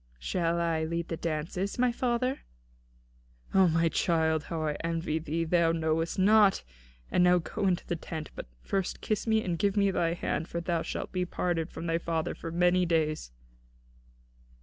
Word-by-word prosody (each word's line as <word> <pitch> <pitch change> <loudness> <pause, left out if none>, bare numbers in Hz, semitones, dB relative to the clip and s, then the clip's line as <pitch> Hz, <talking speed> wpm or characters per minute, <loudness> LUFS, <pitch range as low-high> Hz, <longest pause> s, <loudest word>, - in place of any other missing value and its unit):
"Shall 170 - -1
I 165 -2 0
lead 170 +1 -3
the 165 - -2
dances, 165 +5 -3
my 250 0 +3
father?" 255 +2 0 1.1
"O 190 -1 +6
my 165 0 +2
child, 160 -2 +1
how 160 -1 -3
I 150 -1 0
envy 165 -1 -1
thee, 160 +1 -2
that 160 - -7
thou 170 -1 +4
knowest 165 0 0
naught! 205 +1 +5 0.5
And 180 - +4
now 180 0 +6
go 195 +4 -2
into 180 -2 0
the 175 - -2
tent; 160 -1 -6
but - - -8 0.2
first 195 -2 -2
kiss 215 +1 -2
me, 220 0 +3
and 170 -3 -2
give 200 0 +1
me 200 -1 +4
thy 170 -2 +1
hand, 165 -1 -2
for 170 - -3
thou 170 -1 -1
shalt - - -4
be 185 -1 -1
parted 175 -2 -1
from 165 - -7
thy 165 0 0
father 165 0 -2
for 165 - -7
many 180 +2 +3
days." 155 - 0
170 Hz, 180 wpm, -29 LUFS, 165-185 Hz, 1.1 s, O